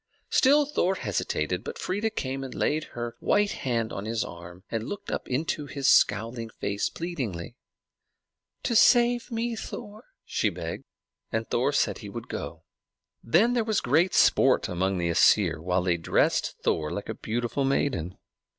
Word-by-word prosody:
Still 290 +2 +5
Thor 190 -10 0
hesitated; 90 - -2
but - - -6
Freia 205 +4 -1
came 135 -8 -4
and 130 - -7
laid 155 +1 0
her 120 -1 -4
white 205 0 +2
hand 115 -4 -2
on 100 - -5
his 115 +1 -1
arm, 85 -3 -10
and 115 0 -3
looked 205 - -6
up - - -3
into 145 +2 -2
his 140 -1 -2
scowling 115 +3 +3
face 100 -2 -2
pleadingly. 125 - -5 1.1
"To 235 - 0
save 240 +1 +5
me, 230 0 -2
Thor," 215 0 -8 0.2
she - - 0
begged. - - -6 0.5
And - - -2
Thor - - +1
said - - +1
he - - -8
would - - -8
go. - - -6 0.6
Then 240 +2 +3
there 240 -2 +2
was 220 -2 +1
great 175 +3 +2
sport - - +4
among 95 +2 -1
the 85 -1 0
Æsir, 80 - +4
while 90 +2 0
they 90 -2 +1
dressed 80 - +1
Thor 75 -1 0
like 100 - -5
a - - -3
beautiful 120 +4 -2
maiden. 135 - 0
125 Hz, 160 wpm, -27 LUFS, -, 1.1 s, Still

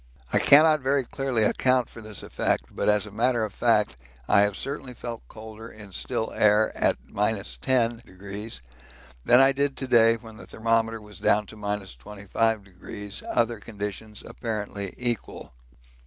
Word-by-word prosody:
I - - +5
cannot 155 +2 +6
very 135 +1 +1
clearly 130 -2 -1
account 130 +3 +2
for 115 - -12
this 110 -3 -5
effect, - - 0
but - - +1
as 105 -1 +3
a 105 - -10
matter 120 +2 +1
of 105 - -8
fact 105 - +2 0.3
I - - +5
have 105 -1 +2
certainly 135 -2 -5
felt 115 0 -7
colder 110 0 -10
in 105 -2 -12
still 80 - -3
air 105 +1 +3
at - - +2
10° 105 - -2 0.6
than 125 - +6
I 135 0 +6
did 140 0 -1
to 130 - -3
day 115 -2 +5
when 115 -1 -13
the - - -11
thermometer 115 0 0
was 105 -1 -12
down 105 +1 +3
to 110 - -12
25°, 100 - -3
other 115 -1 +1
conditions 105 0 -6
apparently 105 -3 -4
equal. 120 - -4
110 Hz, 150 wpm, -26 LUFS, 105-120 Hz, 0.6 s, cannot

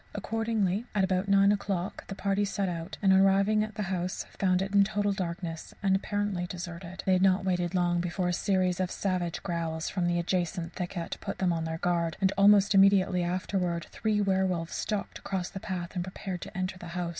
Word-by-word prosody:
Accordingly, 225 -1 -1
at 200 - +3
about 190 0 +1
nine 200 0 +5
o'clock 200 -1 -2
the 195 - -6
party 200 +1 0
set 200 -1 -1
out, 170 +1 -5
and, 190 -1 +6
on 190 - +6
arriving 195 +2 +4
at 215 -1 -6
the 210 - -2
house, 185 -1 -3
found 185 -2 +3
it 195 +1 -5
in 200 0 +6
total 205 0 0
darkness 170 -3 -5
and 190 -1 +3
apparently 200 -2 -1
deserted. 175 0 -7
But - - -22
they 190 - +3
had 185 - +3
not 190 0 +3
waited 180 -1 0
long 175 -1 +2
before 175 +1 -1
a 180 - 0
series 185 -1 +1
of 185 -1 0
savage 180 -4 -2
growls 165 -2 -2
from 180 -3 -1
the 175 0 +1
adjacent 175 -1 -1
thicket 175 -1 -4
put - - -4
them 180 -2 +1
on 165 -1 -2
their 160 0 -3
guard, 170 -1 0
and 195 0 +2
almost 200 0 +6
immediately 195 -2 +5
afterwards 175 -1 -1
three 215 -2 0
werwolves 190 -4 0
stalked 205 -3 -3
across 190 -3 -3
the 195 - -6
path 180 -2 -5
and 180 -2 -2
prepared 185 -1 -6
to - - -8
enter 185 0 -3
the 175 - -8
house. 175 -1 -1
185 Hz, 210 wpm, -29 LUFS, 175-195 Hz, -, and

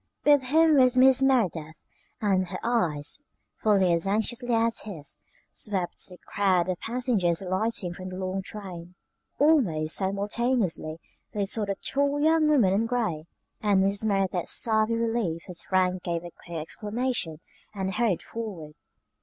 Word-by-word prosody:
With 290 -3 +5
him 315 +3 +4
was 255 -1 +5
Mrs. 265 +1 +6
Merideth, 170 - 0 0.4
and 190 -3 +1
her - - -5
eyes, 175 - 0 0.4
fully 195 -5 +3
as 170 +2 0
anxiously 235 +4 0
as 230 0 +1
his, 165 -9 -6 0.3
swept 190 -4 -2
the 180 - -11
crowd 185 -3 +1
of 180 - -2
passengers 225 -8 0
alighting 190 -1 -1
from 185 +1 -8
the 185 - -7
long 185 +1 -3
train. 180 -3 -9 0.4
Almost 195 - +2
simultaneously 200 -3 -1 0.4
they 205 -1 0
saw 210 +2 +2
the 200 -1 -2
tall 280 +6 -1
young 315 +1 +3
woman 235 -11 +4
in 220 +3 +1
gray; 220 -11 -1 0.4
and 200 -3 +3
Mrs. 200 +2 0
Merideth 195 -4 0
sighed 220 -1 +2
with 230 0 0
relief 225 -8 -1
as 175 -2 -3
Frank 185 -1 +1
gave 170 -1 -3
a 175 - -8
quick 170 0 -9
exclamation 205 0 -3 0.4
and 190 -1 -2
hurried 215 -6 0
forward. 195 -10 -7
200 Hz, 150 wpm, -27 LUFS, 180-235 Hz, 0.4 s, Mrs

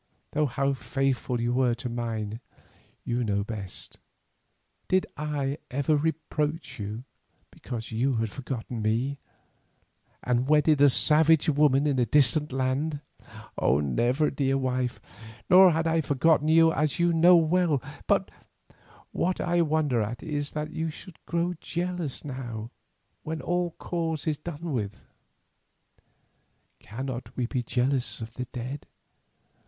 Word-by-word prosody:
though 150 0 +1
how 140 +2 0
faithful 130 +1 -1
you 120 +1 0
were 125 -2 +2
to 125 +1 -5
mine 115 -2 -3 0.6
you 120 +1 -1
know 100 -2 0
best. 105 -3 -8 0.9
Did 185 0 +2
I 145 -2 -2
ever 140 +3 +1
reproach 150 -2 -2
you 105 +4 -5 0.5
because 115 -2 -7
you 125 +4 +1
had 110 -2 -1
forgotten 125 -2 -5
me, 120 +6 0 1.0
and 125 +1 +1
wedded 150 -1 +4
a 145 - +8
savage 155 +3 +4
woman 145 -1 +3
in 140 -3 +1
a 120 - +2
distant 145 +3 +3
land?" 135 +3 -1 0.6
"Never, 120 - +2
dear 135 -1 +1
wife, 130 -1 -1 0.5
nor 185 +1 +9
had 165 -1 0
I 165 0 +2
forgotten 150 +2 +2
you 160 +1 +5
as 155 -2 0
you 170 -1 +2
know 175 +2 +7
well; 165 -2 +3 0.3
but - - +2 0.8
what 185 +1 -1
I 175 -1 +1
wonder 150 -6 +1
at 115 +3 -4
is 145 -3 -3
that 150 0 -3
you 160 0 -2
should 165 +2 -12
grow 170 +1 0
jealous 175 -5 -3
now 120 -5 -6 0.5
when 160 0 -4
all 175 -1 -1
cause 165 -3 -3
is 155 -3 -1
done 165 +1 -6
with." 105 -4 -4 1.8
"Cannot 130 +3 -6
we 125 - 0
be 125 +1 -2
jealous 125 +2 -1
of 115 0 -7
the 125 +2 -4
dead? 125 +3 -7
140 Hz, 135 wpm, -27 LUFS, 120-160 Hz, 1.8 s, nor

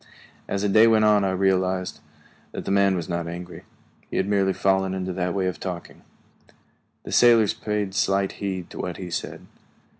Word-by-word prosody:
As 100 0 -2
the - - +2
day 110 +3 +6
went 110 -1 +4
on 105 -1 +4
I 95 - +1
realized 95 -1 0 0.5
that - - -6
the - - -2
man 100 -1 +3
was 85 -3 -4
not 85 -1 -3
angry; 90 +1 -8 0.4
he - - -4
had 95 - 0
merely 100 -2 +2
fallen 95 0 +1
into 95 -1 -3
that 90 0 -2
way 95 -1 0
of 90 - -3
talking. 90 -3 -7 1.0
The - - -8
sailors 115 -4 +5
paid 105 -2 -3
slight 95 0 +1
heed 95 -3 -4
to - - -9
what 90 -1 -4
he 90 -2 -7
said. - - -5
95 Hz, 185 wpm, -24 LUFS, 90-100 Hz, 1.0 s, day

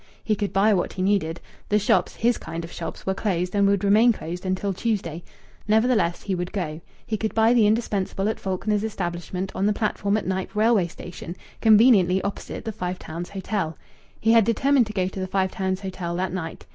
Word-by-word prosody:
He 215 - +1
could 205 0 -2
buy 205 +3 +4
what 180 - 0
he 185 - -2
needed. 185 -5 +1 0.3
The 210 - +4
shops 210 - +2
his 240 +1 +1
kind 165 +1 -6
of 165 - -8
shops 165 - -7
were 190 - +1
closed, 180 -3 -1
and 200 -1 +3
would 200 -1 +2
remain 215 +4 +5
closed 180 -2 -5
until 185 +1 -1
Tuesday. 180 -6 -2 0.4
Nevertheless, 215 -5 +2
he 200 - -2
would 180 -1 -3
go. 165 -5 -4 0.2
He 220 - -2
could 220 +1 -3
buy 225 +1 +5
the 225 -4 +5
indispensable 205 -3 0
at 220 - -2
Faulkner's 200 +2 -1
establishment 185 -2 -4
on 195 - 0
the 210 - +3
platform 205 -1 0
at 215 - -3
Knype 190 +2 -3
railway 215 -4 +3
station, 175 0 -9 0.3
conveniently 210 -5 +6
opposite 200 - -5
the 220 - -2
Five 180 -3 -4
Towns 170 +2 -7
Hotel. 190 -5 -3 0.4
He 225 - +3
had 230 -1 +6
determined 245 +3 +3
to 215 - -7
go 185 -2 0
to 190 - -6
the 185 - -2
Five 190 0 0
Towns 190 0 -2
Hotel 185 -3 -4
that 180 0 -2
night. 165 -3 -5
195 Hz, 205 wpm, -24 LUFS, 180-215 Hz, 0.4 s, conveniently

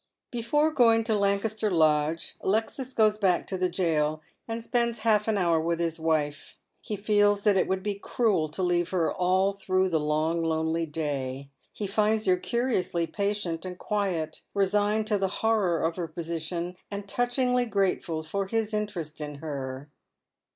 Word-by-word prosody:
Before 295 +7 +1
going 230 -5 +4
to 225 0 0
Lancaster 205 +2 +1
Lodge, 155 -2 +2
Alesds 225 +6 -1
goes 215 -1 +3
back 185 -4 +2
to 190 - -4
the 185 0 0
jail, 155 -4 0 0.2
and 225 0 -4
spends 235 -1 0
half 210 -1 +3
an 220 -2 +2
hour 170 -4 +2
with 170 +1 -1
his 165 -1 -1
wife. 155 -2 -1 0.3
He 210 - -4
feels 205 0 +2
that 210 -2 +4
it 190 - +2
would 190 0 -1
be 205 0 -1
cruel 200 -4 0
to 155 +5 -4
leave 175 -1 +1
her 175 -4 +1
all 185 +2 +2
through 190 -1 0
the 165 -3 +1
long 155 +2 0
lonely 160 0 0
day. 140 -3 -3 0.2
He 210 - -5
finds 215 +2 +1
her 185 -1 +4
curiously 225 -6 0
patient 200 -4 -2
and 180 -1 -6
quiet, 180 -8 -2
resigned 205 +2 +2
to 210 -2 +1
the 195 - +1 0.2
horror 205 -7 +2
of 165 +2 0
her 175 -2 -2
position, 170 +2 -4
and 200 0 -6
touchingly 245 +2 +1
grateful 190 -6 0
for 195 +5 -2
his 225 +1 -1
interest 180 -8 -3
in 150 -1 -5
her. 140 -2 -5
190 Hz, 165 wpm, -27 LUFS, 165-210 Hz, 0.3 s, going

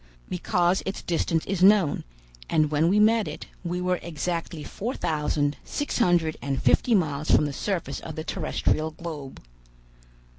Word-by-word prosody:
"Because 180 0 +1
its 195 - -4
distance 165 -1 0
is 190 -2 -2
known, 195 -5 +5 0.5
and 155 -1 +2
when 155 +2 +3
we 200 +4 +3
met 220 0 +4
it, - - -6 0.2
we 175 0 -2
were 180 0 0
exactly 170 -1 -4
four 240 - -4
thousand 150 -2 0
six 290 -3 -3
hundred 175 -7 +2
and 135 -1 -2
fifty 235 - +3
miles 155 -5 0
from 150 - +5
the 145 - -3
surface 170 -5 -3
of 160 - -8
the 155 - -4
terrestrial 160 -2 -1
globe." 155 -4 -8
170 Hz, 155 wpm, -26 LUFS, 155-185 Hz, 0.5 s, known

